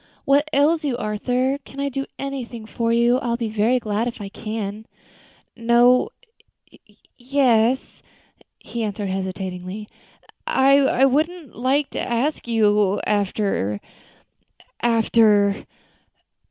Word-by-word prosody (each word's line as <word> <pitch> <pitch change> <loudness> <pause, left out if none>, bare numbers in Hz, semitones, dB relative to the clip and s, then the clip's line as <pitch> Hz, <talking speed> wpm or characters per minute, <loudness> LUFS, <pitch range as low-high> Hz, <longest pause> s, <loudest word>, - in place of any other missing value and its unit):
"What 285 +2 +3
ails 310 +3 +3
you, 270 -5 -1
Arthur? 250 +5 -1
Can 275 -1 -13
I 280 0 -1
do 275 +1 -4
anything 250 -5 -6
for 230 +1 -2
you? 235 +2 +3
I 250 - -5
will 235 - 0
be 230 -2 -3
very 220 +4 +2
glad 220 -1 -1
if 235 - -6
I 200 -1 -6
can." 215 0 -5 0.7
"No 240 - +4 1.1
yes 250 -1 +1 0.3
" - - -40 0.2
he 235 - -6
answered 205 -1 -3
hesitatingly; 190 +1 -5 0.6
"I 270 -1 +4
wouldn't 310 +2 -1
like 270 +4 0
to - - -3
ask 245 +4 -1
you 210 -3 +2
after 195 - -1 1.0
after 225 -2 +4 0.2
" - - -9
"Oh! - - -16
235 Hz, 125 wpm, -22 LUFS, 210-270 Hz, 1.1 s, No